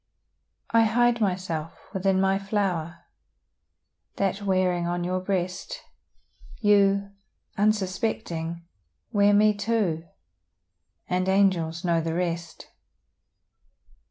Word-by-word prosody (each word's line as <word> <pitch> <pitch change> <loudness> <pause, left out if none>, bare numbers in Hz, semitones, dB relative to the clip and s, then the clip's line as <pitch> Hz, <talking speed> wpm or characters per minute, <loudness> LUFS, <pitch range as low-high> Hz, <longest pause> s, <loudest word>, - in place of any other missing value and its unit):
I 230 0 +5
hide 240 +1 +2
myself 180 -5 -2
within 190 0 +1
my 195 0 +2
flower, 185 -5 -2 1.1
That 195 +1 -1
wearing 185 -3 +1
on 175 0 -2
your 185 +1 -1
breast, 185 -1 -3 0.8
You, 200 -2 +3 0.4
unsuspecting, 185 -5 -1 0.5
wear 205 -2 +4
me 210 +1 +5
too 205 -6 -1 1.0
And 185 +1 0
angels 185 -4 +2
know 170 -1 +2
the 165 0 -3
rest. 170 -1 -4
190 Hz, 90 wpm, -26 LUFS, 170-205 Hz, 1.1 s, I